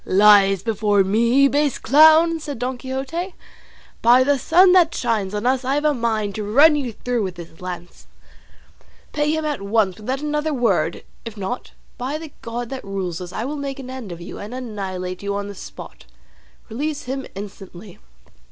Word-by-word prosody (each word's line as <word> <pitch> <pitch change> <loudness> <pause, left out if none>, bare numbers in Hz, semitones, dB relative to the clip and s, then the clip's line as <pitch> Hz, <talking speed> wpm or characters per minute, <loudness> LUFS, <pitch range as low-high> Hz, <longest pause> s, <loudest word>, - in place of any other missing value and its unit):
"Lies 195 -1 +5
before 210 -3 +2
me, 235 +8 +3
base 290 -1 +1
clown!" 315 +5 +5
said 290 -4 -6
Don 250 +3 -2
Quixote. 275 +8 -4 0.7
"By 245 +3 +6
the 280 0 +2
sun 360 +8 +5
that 355 -3 +4
shines 210 -5 -1
on 210 +3 -3
us 260 +1 +1
I 265 +2 0
have 295 +1 -1
a 300 - +4
mind 220 -5 -1
to 215 - -4
run 285 +10 +5
you 270 -5 -2
through 245 +2 -2
with 185 -3 -3
this 170 -1 -12
lance. 175 -1 -8 1.1
Pay 295 0 0
him 315 0 -1
at 295 -7 -2
once 200 -2 +1
without 255 +6 -3
another 300 0 -1
word; 210 -9 0 0.2
if 230 -2 -8
not, 200 +5 -5 0.3
by 265 +5 -2
the 315 -1 -9
God 235 +1 -5
that 265 -1 -6
rules 190 -3 -4
us 180 -1 -7
I 220 - -4
will 295 +3 -4
make 280 -1 -4
an 260 -2 -8
end 255 -7 -7
of 170 - -7
you, 175 - -9
and 210 +5 -7
annihilate 190 -7 -5
you 200 0 -3
on 200 0 -3
the 205 - -7
spot; 190 - -11 0.6
release 290 +6 -3
him 265 +1 -5
instantly." 195 -1 -10
240 Hz, 185 wpm, -21 LUFS, 200-280 Hz, 1.1 s, By